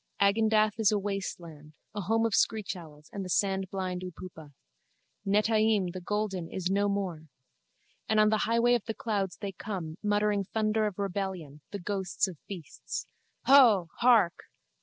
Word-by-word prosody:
Agendath 215 +1 +3
is 220 -2 +4
a 210 - +2
waste 195 -2 -3
land, 155 -3 -13 0.2
a 205 - -3
home 225 +4 +1
of 225 - 0
screechowls 170 -10 -1
and 200 - -4
the 185 - -7
sandblind 190 -1 -1
upupa. 170 -4 -9 0.8
Netaim, 215 -2 +2
the 185 - -6
golden, 195 -3 -2
is 185 0 -2
no 200 +1 +2
more. 185 -6 -3 0.8
And 220 - +3
on 215 0 +5
the 215 0 +2
highway 235 +1 +3
of 240 -4 0
the 225 - -4
clouds 200 -4 -2
they 200 -2 -5
come, 180 -4 -6
muttering 205 -1 +1
thunder 215 +2 0
of 205 - -6
rebellion, 190 -7 -4
the 205 - -5
ghosts 195 0 -1
of 175 -6 -9
beasts. 180 -7 -6 0.4
Huuh! 230 -11 +6
Hark! 235 -8 +4
200 Hz, 155 wpm, -29 LUFS, 180-215 Hz, 0.8 s, Huuh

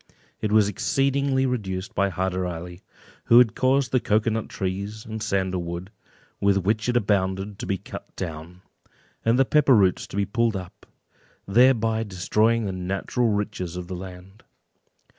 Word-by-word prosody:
It 105 - -1
was 105 -1 +5
exceedingly 135 +5 +1
reduced 105 -4 -3
by 100 -2 +1
Hyder 95 0 -2
Ali, 90 +1 -7 0.4
who 120 +1 +7
caused 130 +3 +1
the 130 - +3
cocoa 110 0 +1
nut 110 0 -3
trees 100 +3 -4
and 110 0 -6
sandal 95 -3 -1
wood 85 +3 -6 0.5
with 100 -1 +3
which 110 +5 0
it 120 - +2
abounded 100 -2 0
to - - -5
be 95 - 0
cut - - -10
down, 85 +1 -7 0.6
and 115 +2 +3
the 135 - +4
pepper 140 -2 +4
roots 95 -4 +2
to - - -7
be 100 - +2
pulled 115 +2 0
up, 90 -2 -8 0.6
thereby 115 0 +4
destroying 110 +3 +1
the 100 - -2
natural 95 +6 -1
riches 100 -4 -2
of 90 - -5
the 90 - -5
land. 95 +2 -10
100 Hz, 160 wpm, -24 LUFS, 95-115 Hz, 0.6 s, who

